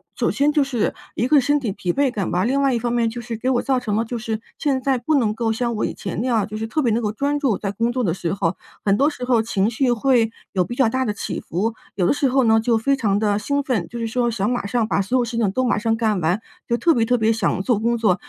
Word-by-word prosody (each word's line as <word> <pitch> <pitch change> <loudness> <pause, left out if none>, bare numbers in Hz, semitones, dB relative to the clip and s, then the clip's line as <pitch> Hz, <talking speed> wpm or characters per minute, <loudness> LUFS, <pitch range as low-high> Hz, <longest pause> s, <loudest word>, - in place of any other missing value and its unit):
首 - - 0
先 290 +1 +2
就 300 0 +2
是 250 -6 -1 0.2
一 235 - 0
个 295 +1 +5
身 290 +3 +2
体 240 -7 -2
疲 180 -2 -2
惫 280 -2 +2
感 200 -6 -2
吧， 180 +1 +1
另 270 +4 +1
外 275 -2 +2
一 235 - 0
方 240 +1 -2
面 235 -1 +1
就 240 +2 -6
是 235 -1 -5
给 250 +4 -1
我 245 -2 +2
造 265 -2 +1
成 220 -5 -2
了 225 - +1
就 235 +1 -4
是 220 -1 -4 0.2
现 275 -4 0
在 265 0 +1
不 275 +6 0
能 225 -6 +2
够 225 0 -1
像 235 +1 -1
我 215 - 0
以 - - -3
前 190 -2 -5
那 250 - -1
样 225 -5 +2
就 215 0 -6
是 220 +1 -3
特 305 +7 -1
别 240 -5 +1
能 230 +2 +1
够 210 -2 -1
专 285 +5 -1
注 260 -9 +1
在 200 - -3
工 230 +4 0
作 255 0 -1
的 175 -7 +1
时 175 -1 -3
候。 185 -2 -1 0.3
很 200 0 +2
多 285 +5 +3
时 270 -5 -8
候 245 -2 +3
情 215 -2 0
绪 250 +3 0
会 240 -1 +2 0.2
有 185 -2 +1
比 240 - -6
较 250 -3 +3
大 260 +3 0
的 210 - -1
起 200 - -4
伏， 210 +7 -2 0.2
有 190 -3 +1
的 - - +3
时 285 -1 +1
候 265 +1 +2
呢， 225 -1 +4
就 225 +1 +2
非 250 +5 +1
常 210 -7 +1
地 205 -1 +1
兴 280 +7 -1
奋， 235 -10 -1
就 235 - -7
是 230 - -2
说 240 +1 0
想 210 -2 -1
马 245 -4 -1
上 235 +1 +1
把 200 - +1
所 245 +7 0
有 250 - +2
事 235 0 -4
情 225 -4 +2
都 255 +6 0
马 245 - +1
上 225 +1 +1
干 220 -3 0
完， 175 +5 0 0.3
就 235 - +1
特 335 +6 +3
别 230 -4 +2
特 245 +2 +2
别 220 -1 +2
想 220 -4 0
做 235 -1 +1
工 235 +2 +1
作； 215 -6 +3
230 Hz, 330 characters per minute, -21 LUFS, 215-255 Hz, 0.3 s, 个